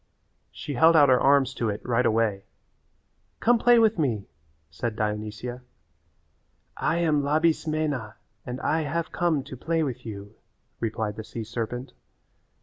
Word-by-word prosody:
She 145 - -6
held 160 +6 +5
out 145 -3 +6
her 125 -1 +5
arms 135 -1 +4
to 115 -4 -1
it 105 0 -3
right 125 +1 +2
away. 110 -3 0 0.9
"Come 240 0 +3
play 240 +1 +5
with 225 -4 +3
me," 115 -10 0 0.5
said 110 +8 -3
Dionysia. 105 +3 -4 1.1
"I 165 - 0
am 155 -4 +2
Labismena 155 -5 0 0.3
and 125 +1 -6
I 160 +1 +1
have 160 +3 -3
come 165 -6 0
to 135 -1 -9
play 165 +5 -1
with 125 -4 -4
you," 100 -2 -8 0.5
replied 110 -2 -3
the 110 - -5
sea 115 +1 -6
serpent. 115 +3 -5
130 Hz, 145 wpm, -26 LUFS, 110-155 Hz, 1.1 s, out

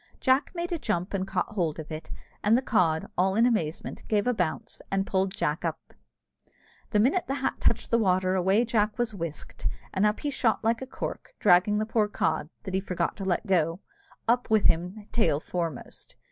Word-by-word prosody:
Jack 260 +2 +3
made 345 +1 -3
a 340 - -1
jump 180 -7 -2
and 190 -1 -1
caught 190 - -1
hold 175 -8 -1
of 160 0 -8
it, 155 +1 -6 0.3
and 215 +3 +5
the 260 - -1
cod, 165 -10 +2
all 190 +1 +2
in 230 +2 +5
amazement, 175 -10 -1
gave 210 -2 +1
a 250 - +2
bounce 180 -7 -3
and 195 0 0
pulled 190 -1 0
Jack 150 +3 -1
up 165 -2 -4 1.0
The 210 - +2
minute 275 - +2
the 275 - -1
hat 265 -1 -1
touched 235 - +1
the 235 - +4
water 185 -3 +2
away 190 +5 +3
Jack 215 -2 +1
was 240 -3 -1
whisked, 165 -6 -5 0.3
and 190 - +1
up 210 0 +2
he 290 - -1
shot 235 -6 +1
like 225 +2 +1
a 260 - -5
cork, - - -6
dragging 185 +4 +4
the 215 - 0
poor 220 -1 +1
cod, 160 -6 -1
that 190 - -6
he 190 - +2
forgot 185 -2 -2
to 195 - -5
let 180 -2 0
go, 165 -2 +1 0.5
up 245 +2 +2
with 220 -2 +3
him 180 +6 +1
tail 220 -11 +2
foremost. 165 -5 -5
195 Hz, 200 wpm, -27 LUFS, 175-230 Hz, 1.0 s, and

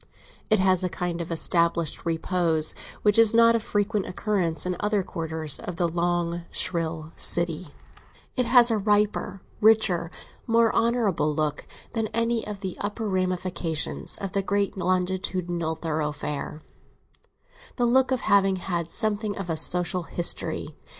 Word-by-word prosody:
It 215 - +5
has 185 -1 +2
a 180 - 0
kind 175 -1 -3
of 170 - -6
established 170 0 0
repose 165 -1 +1 0.3
which 210 +1 +4
is 225 -1 +6
not 230 0 +6
of 230 - 0
frequent 205 -1 -1
occurrence 180 -5 -1
in 180 0 -1
other 210 -1 0
quarters 160 -4 -1
of 180 - -6
the 175 0 +1
long, 170 0 -1
shrill 160 -2 -2
city; 170 -2 0 0.6
it 250 -3 +1
has 240 -1 +6
a 220 - +1
riper, 205 -1 0 0.2
richer, 210 -6 +3 0.4
more 230 -1 +3
honourable 220 -10 +1
look 150 -1 -2 0.3
than 225 -2 -1
any 230 -1 0
of 205 -2 -7
the 190 -2 -4
upper 210 +2 -3
ramifications 185 -4 -1
of 195 -2 -5
the 200 - 0
great 200 +1 -1
longitudinal 180 -2 -1
thoroughfare—the 150 -2 -4 1.3
look 260 +2 +3
of 260 -3 0
having 195 -1 +3
had 175 -2 -3
something 215 0 -1
of 170 - -4
a - - 0
social 180 +2 +3
history. 170 0 0
185 Hz, 140 wpm, -25 LUFS, 170-210 Hz, 1.3 s, is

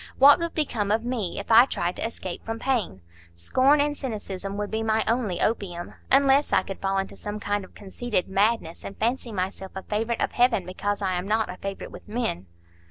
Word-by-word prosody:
What 280 +2 +8
would 335 0 -3
become 225 -10 0
of 225 +2 +1
me, 235 -7 -2
if - - -5
I 230 +2 +9
tried 175 -6 -2
to - - -1
escape 185 -6 -7
from 225 0 -4
pain? 230 - -1 0.3
Scorn 260 - +3
and 290 0 +1
cynicism 200 -7 -5
would 205 0 -3
be 220 0 -1
my 220 0 +2
only 225 -6 0
opium; 180 -6 -1 0.2
unless 275 +1 +5
I - - +4
could 195 - -7
fall 195 0 0
into 195 0 -2
some 210 0 -6
kind 205 0 -1
of 185 - -14
conceited 205 0 -2
madness, 195 -3 0
and 195 - -8
fancy 235 +1 -1
myself 190 -1 -4
a 190 - -5
favourite 225 +2 -1
of - - 0
Heaven 240 -6 +2
because 205 +3 -3
I 190 -1 +1
am 180 +1 -2
not 220 -1 +1
a 180 - -9
favourite 195 +1 -6
with - - -12
men." 215 - -2
210 Hz, 210 wpm, -25 LUFS, 190-240 Hz, 0.3 s, I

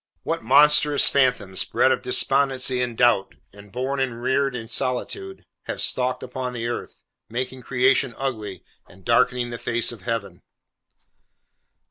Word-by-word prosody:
What - - -2
monstrous 145 +3 +5
phantoms, 125 -9 +1
bred - - +2
of - - 0
despondency 130 -2 +1
and 120 -2 -3
doubt, 120 -6 +2 0.2
and 100 0 -15
born 130 +4 -3
and 125 -3 -2
reared 130 +2 0
in 115 -2 -6
solitude, 135 - -3 0.2
have - - -5
stalked 125 0 0
upon 125 0 -5
the 115 -1 -5
earth, 120 - -6 0.3
making 130 +2 -4
creation 130 -1 +1
ugly, 110 -8 -5 0.3
and 95 0 -19
darkening 125 0 +1
the 120 - -6
face 120 0 +1
of 115 -4 -10
Heaven! 100 -4 -4
125 Hz, 140 wpm, -23 LUFS, 115-130 Hz, 0.3 s, monstrous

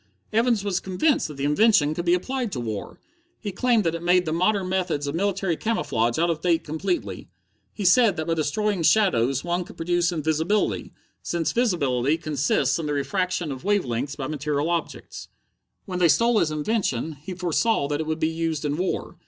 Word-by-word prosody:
"Evans 230 -2 +2
was 195 -3 0
convinced 230 - +1
that 150 - -10
the 140 - -4
invention 150 0 +4
would 175 - -3
be 175 +1 +4
applied 250 +4 -3
to 130 - -3
war. 110 -4 -5 0.4
He 205 - -4
claimed 235 +2 +2
that 165 -2 0
it 170 - -4
made 180 +1 +3
the 155 - -1
modern 185 +3 +1
methods 180 -6 -1
of 140 - -3
military 195 0 0
camouflage 120 - -1
out 170 +1 +2
of 160 -1 -4
date 170 -2 +1
completely. 155 - -3 0.4
He 205 - -5
said 205 0 +5
that 160 - -2
by 165 - 0
destroying 185 +5 0
shadows 135 - +3
one 175 +1 -1
could - - -14
produce 175 +1 +1
invisibility, 160 +5 0 0.3
since 170 -2 -1
visibility 150 - +1
consists 145 -2 0
in 160 - -3
the 150 - -1
refraction 180 +2 -1
of 130 -1 -7
wave 205 -3 +1
lengths 125 +4 -3
by 135 - -5
material 150 +2 -1
objects. 170 -1 -4 0.6
"When 180 -2 -4
they 175 - +5
stole 230 - +4
his 155 - +1
invention, 155 - -1
he 185 +3 -7
foresaw 180 0 +1
that 145 0 -1
it 155 - -5
would 155 0 -2
be 160 - +2
used 160 -2 -2
in 145 0 -1
war. 185 +2 -3
170 Hz, 195 wpm, -24 LUFS, 150-195 Hz, 0.6 s, said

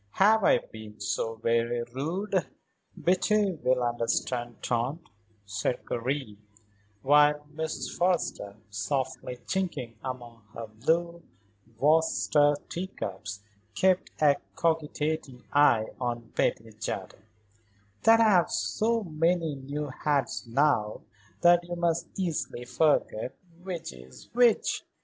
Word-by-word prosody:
Have 215 +2 +4
I - - +6
been 110 -1 -11
so 115 0 -2
very 115 +1 0
rude?" 180 +8 -1 0.5
"Betty 200 +3 +2
will 130 -6 +1
understand, 120 0 -1
Tante," 130 +7 -1 0.4
said 105 +4 -2
Karen 125 -3 -2 0.7
while 150 +1 +5
Mrs. 160 0 -4
Forrester, 175 - 0 0.2
softly 130 +3 -2
chinking 145 - -3
among 120 -3 -6
her 115 - -5
blue 165 +10 -1 0.6
Worcester 150 0 +3
teacups, 105 - -5 0.3
kept 185 -1 +2
a 145 -2 +5 0.2
cogitating 155 -4 -1
eye 120 -7 +5
on 120 -2 -3
Betty 110 0 0
Jardine 95 -2 -5 0.8
"that 225 +1 +6
I - - +6
have 180 -5 +4
so 230 +1 0
many 165 -1 +1
new 140 +2 -5
hats 135 -2 -1
now 115 -4 +1 0.4
that 175 0 +6
you 175 0 -5
must 170 -1 0
easily 145 -9 -2
forget 135 -3 +1 0.3
which 180 - -5
is 65 0 -14
which." 240 -2 +3
145 Hz, 110 wpm, -28 LUFS, 120-170 Hz, 0.8 s, I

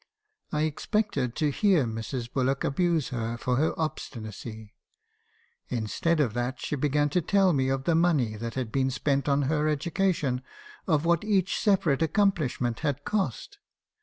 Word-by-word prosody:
I 150 0 0
expected 155 - -1
to 150 -2 +1
hear 185 - +3
Mrs. 115 +2 -5
Bullock 135 +1 0
abuse 165 -1 +1
her 115 -2 -3
for 125 +1 0
her 155 +4 0
obstinacy. 110 - -5 1.0
Instead 125 +8 0
of 125 -8 +2
that, 120 +2 -2
she - - -2
began 145 +1 +1
to 175 +5 +1
tell 190 +1 +3
me 130 -2 +1
of 135 0 -1
the 170 - +2
money 160 -10 +2
that 115 +1 -5
had 125 -4 -3
been 135 0 +1
spent 140 +1 0
on 140 0 +2
her 150 +2 +1
education; 150 -3 0 0.5
of 155 -3 +2
what 170 +1 +2
each 200 -3 +1
se 205 -3 +4
parate 160 -8 0
accomplishment 155 - +1
had 145 0 -2
cost. 205 - -2
145 Hz, 160 wpm, -27 LUFS, 125-170 Hz, 1.0 s, se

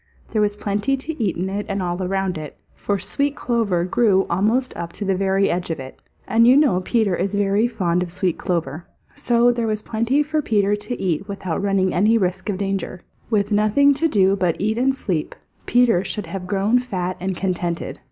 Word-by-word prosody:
There 215 - +1
was 205 0 +1
plenty 210 +6 -1
to 290 -1 -4
eat 195 - -1
in 180 +2 -2
it 200 +2 -4
and 195 0 -1
all 175 0 -2
around 190 0 -1
it, 155 -1 -8 0.2
for 205 - -2
sweet 280 +10 -1
clover 220 -11 0
grew 195 0 +2
almost 220 +9 +1
up 170 0 -5
to 205 - -5
the 195 - +1
very 195 +1 +1
edge 175 0 -2
of 165 - -3
it, 130 0 -9 0.3
and 230 +1 +4
you 255 +3 +7
know 275 -12 +3
Peter 210 -2 +1
is 200 +3 -2
very 205 +3 +2
fond 180 -7 0
of 180 -1 -4
sweet 180 -1 -1
clover. 170 -3 -3 0.3
So 240 0 +3
there 235 -1 -1
was 215 -1 -2
plenty 235 +6 +1
for 305 +1 -1
Peter 205 -5 +1
to 210 +4 -5
eat 185 +1 -1
without 195 -4 -4
running 195 -2 +1
any 215 +5 +3
risk 185 0 -1
of 195 - -1
danger. 195 -2 -3 0.3
With 205 -2 +1
nothing 215 +8 +4
to 305 +4 +1
do 195 -8 +3
but 180 -4 0
eat 215 +3 0
and 265 +1 +2
sleep, 175 - -3 0.3
Peter 240 -7 +3
should 210 -1 -4
have 180 +2 -6
grown 205 +5 +2
fat 185 -7 -3
and 185 +1 -2
contented. 175 -3 -3
200 Hz, 205 wpm, -21 LUFS, 185-230 Hz, 0.3 s, you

